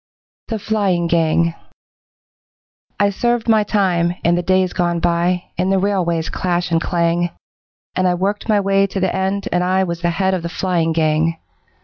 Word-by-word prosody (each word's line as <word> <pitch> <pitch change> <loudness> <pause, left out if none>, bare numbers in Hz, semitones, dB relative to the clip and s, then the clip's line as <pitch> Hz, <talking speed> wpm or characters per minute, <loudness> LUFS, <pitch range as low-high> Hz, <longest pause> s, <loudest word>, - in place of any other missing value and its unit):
The 225 - -2
Flying 200 -5 0
Gang 165 0 +2 1.5
I 200 0 +3
served 240 +3 -1
my 220 -2 +4
time, 180 -5 +1
in 170 - +3
the 175 - +1
days 185 0 +1
gone 175 -1 0
by, 175 +1 +1
In 185 - 0
the 195 - +3
railway's 180 -4 0
clash 180 -1 -2
and 165 0 +2
clang, 170 0 0 0.7
And 185 0 +2
I 180 - +2
worked 200 +5 -2
my 210 -1 +4
way 195 0 +2
to 195 - -4
the 190 -1 0
end, 190 +1 -1
and 180 0 +1
I 185 +1 +2
Was 170 -2 -4
the 175 - +1
head 190 +2 0
of 185 - -1
the 170 - -4
'Flying 170 -2 0
Gang'. 160 +1 +1
180 Hz, 180 wpm, -19 LUFS, 170-195 Hz, 1.5 s, my